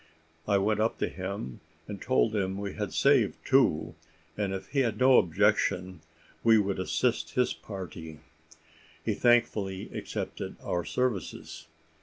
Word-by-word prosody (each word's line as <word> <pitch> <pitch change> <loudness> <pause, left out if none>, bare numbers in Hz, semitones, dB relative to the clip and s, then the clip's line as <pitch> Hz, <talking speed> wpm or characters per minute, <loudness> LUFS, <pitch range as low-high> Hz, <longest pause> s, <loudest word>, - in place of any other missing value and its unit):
I 100 -1 +3
went 105 +2 +1
up 110 +1 +1
to - - 0
him, 95 -10 -6 0.3
and 100 -2 -7
told 115 -3 +2
him 95 -1 -1
we 100 -1 -4
had - - -4
saved - - +3
two, - - +3 0.4
and 100 -2 -1
if 95 0 -5
he 140 - 0
had 115 -5 +1
no 130 +1 +6
objection, 90 +1 +1 0.4
would 105 -4 +3
assist 120 +6 -1
his 125 -1 +2
party. 85 -6 -8 0.9
He - - +1
thankfully 105 -5 +1
accepted - - -5
our 85 - -1
services. 90 -8 -3
100 Hz, 135 wpm, -29 LUFS, 95-115 Hz, 0.9 s, no